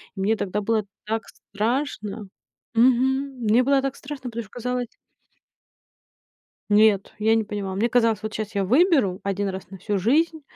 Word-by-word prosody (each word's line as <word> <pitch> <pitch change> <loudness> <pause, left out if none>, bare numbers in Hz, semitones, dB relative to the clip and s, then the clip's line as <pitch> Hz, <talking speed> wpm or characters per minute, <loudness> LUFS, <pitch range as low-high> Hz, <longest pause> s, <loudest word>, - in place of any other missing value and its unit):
И 195 - -5
мне 210 +3 +2
тогда 205 -1 -2
было 215 0 0 0.2
так 225 +1 -2
страшно. 215 -1 -3 0.5
Мгм. 260 +3 +2
Мне 225 +3 +4
было 275 +1 +3
так 275 0 -2
страшно, 270 -3 -7
потому 235 0 -5
что 210 - -18
казалось 250 0 -3 1.8
нет, 210 -1 +4
я 220 +1 +3
не 225 - +2
поняла. 200 -2 -4
Мне 225 +5 +1
казалось, 230 -4 +2
вот 215 -1 -4
щас 215 0 -5
я 200 - +1
выберу 255 - +3
1 200 0 -1
раз 190 -1 -7
на 195 - -9
всю 205 +3 -2
жизнь 310 - +2
220 Hz, 165 wpm, -24 LUFS, 205-255 Hz, 1.8 s, Мне